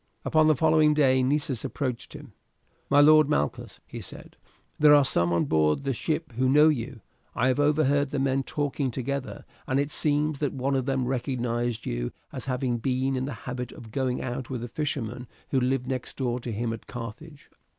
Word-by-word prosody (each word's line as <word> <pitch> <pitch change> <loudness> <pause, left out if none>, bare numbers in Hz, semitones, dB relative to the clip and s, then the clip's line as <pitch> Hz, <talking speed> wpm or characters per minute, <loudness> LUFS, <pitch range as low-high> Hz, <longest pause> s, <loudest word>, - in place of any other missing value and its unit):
Upon 155 -1 +4
the 155 - +5
following 155 +1 +4
day 130 -3 +4
Nessus 135 -2 0
approached 125 -5 -4
him. - - -11 0.6
"My 145 +1 +6
lord 155 0 +6
Malchus," 75 - -2
he - - -8
said, - - -10 0.4
"there 150 0 +7
are 145 -1 +5
some 85 -8 +2
on 85 -1 +2
board 75 - +2
the 135 -1 -1
ship 155 +4 -2
who 130 +3 0
know 150 +3 +6
you. 130 -4 -3 0.3
I 125 - +2
have 130 - +1
overheard 145 -1 +2
the 145 - -3
men 135 0 +1
talking 145 0 -2
together, 135 +2 -4 0.2
and 130 +1 +1
it 140 +1 -1
seems 150 -1 +1
that 145 -3 -1
one 135 +1 -1
of 130 0 -1
them 135 -2 0
recognized 120 -2 -2
you - - -3 0.2
as - - -6
having 125 -2 -1
been 130 +2 0
in 130 0 -1
the 145 - -4
habit 125 -1 -4
of 110 -2 -12
going 130 0 -1
out 125 -1 -4
with 125 -3 -4
a - - -4
fisherman 125 -4 -3 0.2
who 135 - +3
lived 125 0 0
next 130 -1 -4
door 125 -2 -1
to 120 -1 -6
him 115 +2 -2
at 115 - -9
Carthage." 125 +6 -9
130 Hz, 195 wpm, -26 LUFS, 120-145 Hz, 0.6 s, there